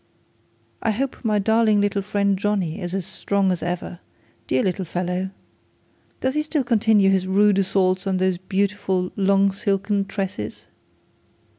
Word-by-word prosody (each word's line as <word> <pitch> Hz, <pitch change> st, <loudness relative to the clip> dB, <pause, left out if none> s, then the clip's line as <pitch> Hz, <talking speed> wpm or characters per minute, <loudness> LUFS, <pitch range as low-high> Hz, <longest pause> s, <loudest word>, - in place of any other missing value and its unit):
'I 225 Hz, -, +1 dB
hope 265 Hz, +5 st, -3 dB
my 215 Hz, -2 st, +1 dB
darling 220 Hz, +1 st, +3 dB
little 205 Hz, 0 st, +1 dB
friend 200 Hz, 0 st, +1 dB
Johnny 195 Hz, -2 st, -1 dB
is 175 Hz, +1 st, -3 dB
as 190 Hz, -3 st, -3 dB
strong 195 Hz, +1 st, 0 dB
as 180 Hz, -, -2 dB
ever, 175 Hz, 0 st, -4 dB, 0.5 s
dear 130 Hz, -, +1 dB
little 190 Hz, 0 st, -1 dB
fellow. 180 Hz, +2 st, -2 dB, 0.9 s
Does 260 Hz, 0 st, 0 dB
he 300 Hz, -, +1 dB
still 305 Hz, -2 st, -1 dB
continue 220 Hz, -4 st, +3 dB
his 190 Hz, -1 st, +1 dB
rude 200 Hz, +1 st, +4 dB
assaults 190 Hz, 0 st, +1 dB
on 190 Hz, -1 st, +1 dB
those 185 Hz, -1 st, +1 dB
beautiful 190 Hz, -1 st, -1 dB
long 195 Hz, 0 st, +3 dB
silken 200 Hz, 0 st, -1 dB
tresses? 190 Hz, -, -5 dB
195 Hz, 145 wpm, -22 LUFS, 185-205 Hz, 0.9 s, rude